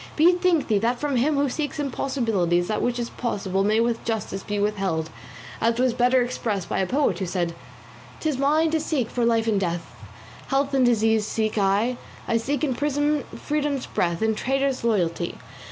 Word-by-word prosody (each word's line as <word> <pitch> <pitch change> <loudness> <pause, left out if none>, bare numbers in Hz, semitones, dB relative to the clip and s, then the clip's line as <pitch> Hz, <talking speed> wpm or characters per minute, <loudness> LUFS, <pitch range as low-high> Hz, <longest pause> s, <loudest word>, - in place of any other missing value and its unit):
Bethink 350 0 +4
thee 210 -3 +2
that 235 +3 +1
from 290 -2 -1
him 290 +5 +2
who 280 0 +2
seeks 290 +2 -3
impossibilities 225 - 0
that 215 - -1
which 245 0 0
is 235 -1 -3
possible 195 -5 -1
may 215 +2 +2
with 235 0 0
justice 215 -4 -3
be 205 +1 -4
withheld, 195 -6 -1 0.5
as 230 0 +2
was 255 -1 +2
better 250 +1 +3
expressed 215 -6 -3
by - - -1
a 190 - +1
poet 250 - +1
who 190 - -1
said: 175 -2 -1 0.7
'Tis 305 -5 -1
mine 310 +3 +3
to 320 - +2
seek 295 -7 -1
for 245 - -1
life 230 -1 +2
in 210 -3 +2
death, 175 -3 -3 0.5
Health 275 +1 0
in 265 -1 +3
disease 225 -3 +3
seek 220 -1 -1
I, 210 +4 +1 0.3
I 230 - +2
seek 270 +4 -2
in 275 -4 +1
prison 290 +2 0
freedom's 295 -3 -2
breath, 170 +3 -1
In 220 0 +2
traitors 270 +3 -1
loyalty. 175 -6 0
235 Hz, 185 wpm, -24 LUFS, 205-275 Hz, 0.7 s, Bethink